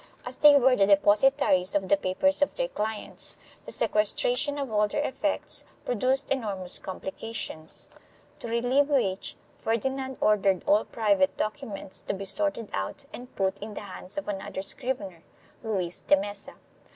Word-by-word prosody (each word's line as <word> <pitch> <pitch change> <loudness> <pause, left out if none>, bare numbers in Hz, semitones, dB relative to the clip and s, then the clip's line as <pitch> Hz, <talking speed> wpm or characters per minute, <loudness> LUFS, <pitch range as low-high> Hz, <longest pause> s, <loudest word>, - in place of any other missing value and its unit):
As 250 +1 -1
they 295 -1 +8
were 265 -2 +5
the 195 -3 +3
deposi 205 +5 +6
taries 185 -8 +2
of 195 -1 +1
the 200 - +5
papers 200 +11 +1
of 285 - +2
their - - -1
clients, 215 - -4 0.3
the - - -7
sequestration 245 +7 +1
of 275 -4 -3
all 210 0 +3
their 290 +8 -1
effects 290 +3 -2 0.2
produced 255 +4 0
enormous 200 -8 +2
complications, 190 -3 -5 0.5
to - - -6
relieve 245 +5 +2
which 200 -10 0 0.3
Ferdi 230 +4 +1
nand 265 -1 -5
ordered 195 -3 +3
all 210 +2 +4
private 200 -4 +1
documents 215 -4 -4
to - - -3
be 195 +1 -6
sorted 290 -2 0
out 100 - -4
and 250 -4 -10
put 195 0 0
in 210 0 -7
the - - -5
hands 190 +1 -8
of 295 - -3
another 195 -1 -4
scrivener, 200 -8 -4 0.4
Luis 190 -6 -1
de - - +4
Mesa. 205 0 -6
215 Hz, 160 wpm, -27 LUFS, 195-265 Hz, 0.5 s, they